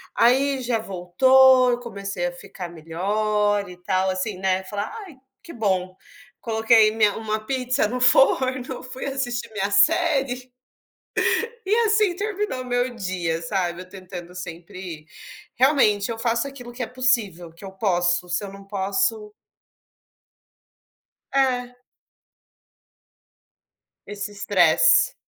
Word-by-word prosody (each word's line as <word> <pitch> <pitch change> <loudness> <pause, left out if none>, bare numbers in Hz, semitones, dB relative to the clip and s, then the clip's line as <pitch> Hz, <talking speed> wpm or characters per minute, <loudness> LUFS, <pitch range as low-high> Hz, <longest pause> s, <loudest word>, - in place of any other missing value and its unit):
Aí 265 +3 +3
já 240 -2 0
voltou, 255 +7 +4
eu 240 - -1
comecei 200 -6 -4
a - - -4
ficar 180 0 -9
melhor 205 +5 -1
e 180 - -11
tal 185 +1 0
assim, 185 +1 -3
né, 190 0 0
fala: 205 +1 -3 0.2
"Ai, 325 - -14 0.3
que 335 - -11
bom!". 185 -4 -1 0.5
Coloquei 220 -1 +4
minha 215 -2 +2
uma 215 -1 -2
pizza 255 -1 0
no 250 +3 -3
forno, 260 0 +3
fui 255 +1 -7
assistir 270 -4 -3
minha 200 -1 -1
série. 265 - +2 1.2
E 405 - +3
assim 425 -3 +3
terminou 410 -9 -3
o - - -11
meu 245 0 -1
dia, 180 -6 -3
sabe, 175 0 -2
eu 185 - -15
tentando 180 -2 -10
sempre, 175 -2 -8 0.5
realmente 240 -6 +3
eu 225 - -5
faço 235 +2 0
aquilo 250 -3 -10
que 245 +1 -6
é - - -2
possível, 225 -10 -1
que 170 +4 -15
eu 190 - -8
posso, 180 -3 0
se 175 +4 -2
eu 195 - -8
não 195 0 -12
posso 200 +2 -1 2.0
É. 250 -2 0 2.3
Esse 205 0 -6
estresse, 195 -5 +4
215 Hz, 125 wpm, -23 LUFS, 185-255 Hz, 2.3 s, voltou